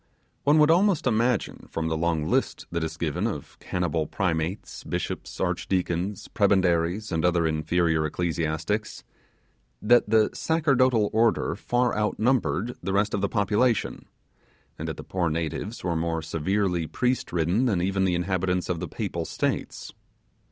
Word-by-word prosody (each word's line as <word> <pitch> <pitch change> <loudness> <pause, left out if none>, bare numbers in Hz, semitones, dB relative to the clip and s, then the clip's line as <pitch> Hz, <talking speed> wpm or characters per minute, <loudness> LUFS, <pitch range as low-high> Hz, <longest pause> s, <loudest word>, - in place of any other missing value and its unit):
One 145 +2 +5
would 150 0 +6
almost 185 0 +3
imagine 120 -1 0
from 80 0 -2
the 80 - 0
long 80 -1 0
list - - 0
that 85 -1 -1
is 80 - -4
given - - -1
of - - -6
cannibal 85 -4 -1
primates, 90 +1 -2
bishops, - - -4
arch - - -1
deacons, 90 +1 -1
prebendaries, 95 0 +1
and 80 -2 0
other 90 -1 +3
inferior 80 +1 +1
ecclesiastics, 85 +6 -2 0.8
that 120 0 +4
the 110 -1 +4
sacerdotal 130 -9 +2
order 110 -9 +2
far 120 +4 0
outnumbered 105 - 0
the 95 +2 -2
rest 100 +1 +1
of 100 - 0
the 100 - 0
population, 105 +3 +1 0.7
and - - -4
that - - -4
the - - -7
poor 90 -3 -1
natives 85 +7 -3
were 85 -2 0
more 80 0 -1
severely 90 +1 0
priest 125 +7 -1
ridden 90 +8 +1
than 100 -7 +1
even 95 +2 0
the 90 -2 +2
inhabitants 90 0 -1
of 90 -2 -1
the - - -4
papal - - -3
states. - - -3
95 Hz, 150 wpm, -26 LUFS, 85-110 Hz, 0.8 s, would